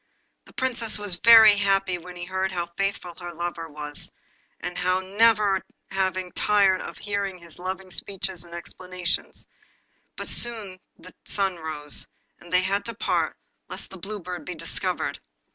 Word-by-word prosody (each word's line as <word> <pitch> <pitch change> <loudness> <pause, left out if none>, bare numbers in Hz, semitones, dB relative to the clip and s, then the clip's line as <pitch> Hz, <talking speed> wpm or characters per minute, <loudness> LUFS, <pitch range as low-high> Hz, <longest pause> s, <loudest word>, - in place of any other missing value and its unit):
The - - -17
Princess 240 -4 0
was 205 -4 -2
very 225 -2 +10
happy 195 -2 +2
when 180 +1 -10
she 175 0 -5
heard 190 +1 -1
how 170 -1 -2
faithful 195 -2 -1
her 175 0 -5
lover 170 -1 -4
was, 150 -1 -4 0.5
and 180 0 -4
would 185 +1 +1
never 210 -3 +5 0.3
have 190 -1 +1 0.2
tired 200 -3 +4
of - - -7
hearing 200 -2 -2
his 170 -1 -13
loving 185 +1 -4
speeches 190 -2 -3
and 170 0 -10
explanations, 180 +1 -3 0.7
but - - -5
too - - +4
soon 215 -6 0 0.2
the 185 - -13
sun 195 -3 0
rose, 155 -2 -3 0.3
and 175 - -14
they 180 0 +5
had 195 +2 +1
to 230 - -4
part - - 0 0.3
lest - - -7
the 190 - -8
Blue 205 +3 -5
Bird 180 -1 -5
should - - -14
be 180 - -5
discovered. - - -2
185 Hz, 165 wpm, -26 LUFS, 175-200 Hz, 0.7 s, very